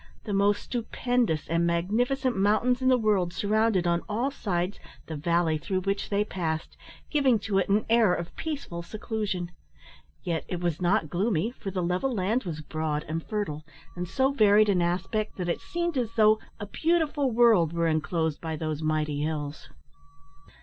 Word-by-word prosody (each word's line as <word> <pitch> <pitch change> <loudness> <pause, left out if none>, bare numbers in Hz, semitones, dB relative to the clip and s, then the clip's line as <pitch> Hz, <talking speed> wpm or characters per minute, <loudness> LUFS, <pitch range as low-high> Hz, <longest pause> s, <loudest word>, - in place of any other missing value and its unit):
The 210 - -4
most 200 +1 +2
stupendous 240 -7 -1
and 165 +1 +1
magnificent 240 +10 0
mountains 215 +6 +2
in 260 - +1
the 255 - +5
world 205 -6 +1
surrounded, 210 -1 +1
on 170 0 +2
all 235 +6 0
sides, 185 -6 -2 0.3
the 160 - -6
valley 165 +1 +1
through 185 +4 -2
which 195 +1 -2
they 205 0 +2
passed, 160 -6 -3 0.4
giving 275 -6 +4
to 195 -2 +1
it 190 - -1
an 210 +2 +2
air 225 -4 +4
of 175 -1 -3
peaceful 280 - -4
seclusion; 195 -1 -4 0.7
yet 165 -2 -2
it 180 - -3
was 175 -1 -2
not 175 -3 +1
gloomy, 195 +2 0
for 215 -5 -7
the 185 -2 -2
level 180 +10 0
land 220 +2 0
was 160 -3 -4
broad 155 -1 -2
and 160 +1 -3
fertile, 190 -8 -3 0.3
and 180 0 -4
so 265 +8 +1
varied 215 -4 +5
in 185 -3 +3
aspect 190 +5 -1
that 180 -2 -2
it - - -1
seemed 345 -1 -2
as 230 -2 -3
though 215 -1 +5 0.2
a 205 - -4
beautiful 310 - +1
world 225 -9 +4
were 170 0 0
enclosed 160 0 0
by 160 -1 -3
those 155 -1 -3
mighty 155 -2 0
hills. 150 -3 -4
195 Hz, 170 wpm, -27 LUFS, 170-225 Hz, 0.7 s, the